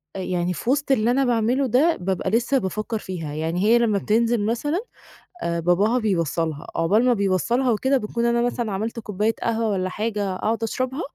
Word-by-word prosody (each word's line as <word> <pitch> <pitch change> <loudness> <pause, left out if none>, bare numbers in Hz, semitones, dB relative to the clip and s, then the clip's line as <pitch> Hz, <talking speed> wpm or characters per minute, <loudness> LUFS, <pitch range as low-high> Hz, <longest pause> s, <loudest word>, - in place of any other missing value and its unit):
آآ، - - -4
يعني 180 -1 -1
في 230 - -4
وسط 275 +1 +1
اللي 235 -2 +3
أنا 270 +2 +2
باعمله 245 +3 +1
ده 285 +8 +3
بابقى 190 +1 -1
لسّه 240 +6 +2
بافكّر 215 +1 -2
فيها، 165 -7 -6
يعني 165 +4 -2
هي 225 +3 +5
لمّا 230 -4 +2
بتنزل 225 +2 +1
مثلًا، 290 - -1 0.6
آآ، 170 0 -1
باباها 195 +8 +2
بيوصّلها 165 - -1
عقبال 200 +9 +2
ما 250 - +4
بيوصّلها 230 +5 +1
وكده 265 +5 +2
باكون 235 0 -2
أنا 235 0 +2
مثلًا 240 -2 -1
عملت 220 +4 -3
كوباية 210 +1 -1
قهوة 230 -1 0
والّا 185 -2 -1
حاجة 205 -1 -2
أقعد 225 +4 -1
أشربها، 255 +6 -2
220 Hz, 185 wpm, -23 LUFS, 185-240 Hz, 0.6 s, هي